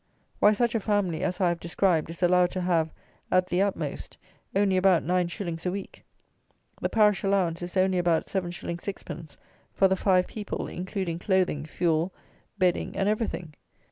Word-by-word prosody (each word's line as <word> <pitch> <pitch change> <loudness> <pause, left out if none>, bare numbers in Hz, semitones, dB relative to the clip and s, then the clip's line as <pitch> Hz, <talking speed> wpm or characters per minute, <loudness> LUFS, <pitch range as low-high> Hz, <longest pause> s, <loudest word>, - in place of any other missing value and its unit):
Why 210 - +6
such 235 +2 +1
a 225 - +1
family 200 -6 0
as 180 - -1
I 180 -3 +3
have 170 0 -2
described 170 -1 +1
is 165 +2 -6
allowed 180 0 +4
to 185 - -2
have, 165 -3 +1 0.4
at 185 0 +4
the 180 +1 0
utmost, 200 -1 -3 0.4
only 195 -1 +3
about 185 -2 +4
9_s._ 175 -1 -1
a 180 - 0
week. 195 0 -7 0.8
The - - 0
parish 210 -2 +3
allowance 185 -4 +1
is 175 +2 -5
only 185 -1 +3
about 170 -2 +2
7_s._ 185 -3 -2
6_d._ 170 -2 -6 0.4
for 195 - +5
the 190 - +2
five 185 -1 +3
people, 210 -2 -5
including 180 -1 -4
clothing, 180 -6 +1
fuel, 165 +2 0 0.5
bedding 185 -2 +1
and 195 0 +1
everything! 210 -7 -2
180 Hz, 165 wpm, -27 LUFS, 170-195 Hz, 0.8 s, Why